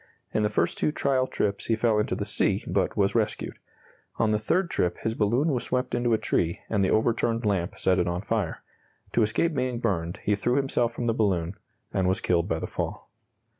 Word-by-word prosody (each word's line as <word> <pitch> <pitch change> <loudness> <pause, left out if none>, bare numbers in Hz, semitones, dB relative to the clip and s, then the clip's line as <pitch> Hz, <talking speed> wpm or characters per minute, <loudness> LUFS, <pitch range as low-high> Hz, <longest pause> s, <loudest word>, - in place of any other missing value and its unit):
In - - +2
the 105 - +2
first 105 - 0
two - - +2
trial 130 -3 +1
trips 100 -5 -2
he 115 - +3
fell 110 -1 +2
into 105 - 0
the - - -3
sea, - - +1
but - - 0
was 100 -1 +2
rescued. 110 -3 -1 0.6
On 110 -1 +2
the 105 - +2
third 170 - 0
trip 90 - 0
his 110 - 0
balloon 120 +8 +2
was 125 -5 0
swept 125 0 -1
into 120 0 +1
a - - +4
tree, 85 -5 0
and 105 -3 +2
the 95 - +2
overturned 115 +1 +1
lamp 95 -4 0
set 95 0 +2
it 90 - +1
on 90 +1 -1
fire. 105 -7 -2 0.5
To - - +2
escape 120 +10 +1
being 130 -3 -1
burned, 95 -5 -1
he 105 - +2
threw 120 +5 +1
himself 135 -4 +1
from 120 +1 -4
the 115 - +2
balloon 95 -6 +1 0.4
and 95 -1 +1
was 95 +4 +1
killed 85 -3 +1
by 80 - +1
the - - -3
fall. - - -5
110 Hz, 215 wpm, -26 LUFS, 95-120 Hz, 0.6 s, a